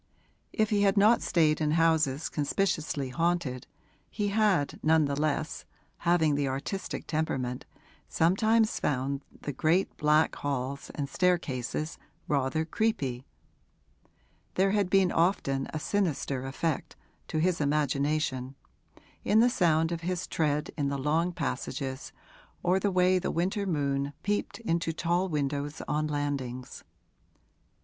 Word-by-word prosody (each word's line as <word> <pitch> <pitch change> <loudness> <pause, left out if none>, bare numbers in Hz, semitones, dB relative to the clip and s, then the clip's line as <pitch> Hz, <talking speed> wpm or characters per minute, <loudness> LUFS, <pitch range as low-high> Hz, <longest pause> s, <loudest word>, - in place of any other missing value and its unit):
If 215 -1 0
he 205 -1 +3
had 200 0 +3
not 215 +4 +5
stayed 155 -3 +2
in 150 0 +1
houses 160 -3 +2
conspicuously 150 -3 -1
haunted 165 -4 -1 0.4
he 205 -1 -2
had, 200 -8 +1
none 160 0 +4
the 140 0 -1
less 155 +1 -1 0.4
(having 170 -3 +3
the 140 -1 0
artistic 140 +9 -4
temperament), 130 -6 -2 0.4
sometimes 220 +6 +2
found 135 0 -1 0.2
the 145 - -4
great 165 +8 +1
black 150 +1 +3
halls 140 -1 -3
and 145 -2 -2
staircases 155 -3 -1 0.3
rather 145 +2 0
'creepy': 140 - -1 1.3
there 195 +1 +3
had 200 -3 +1
been 190 -2 +4
often 140 -6 +1
a - - -3
sinister 145 -7 -1
effect, 150 +3 -2 0.3
to - - -3
his 170 +1 +1
imagination, 145 -2 0 0.7
in 215 - +4
the 245 +2 +5
sound 165 -5 +2
of 170 -1 -3
his 180 +1 -2
tread 150 -2 -1
in 145 -3 0
the 140 - -2
long 155 +6 +1
passages 135 -5 -4 0.5
or 180 +2 +3
the 200 - +1
way 185 0 +3
the - - -2
winter 195 +4 -1
moon 140 -3 -1
peeped 205 0 -1
into 170 -5 -1
tall 175 +3 0
windows 145 -1 -2
on 155 +1 0
landings. 140 -4 -4
155 Hz, 130 wpm, -29 LUFS, 140-180 Hz, 1.3 s, not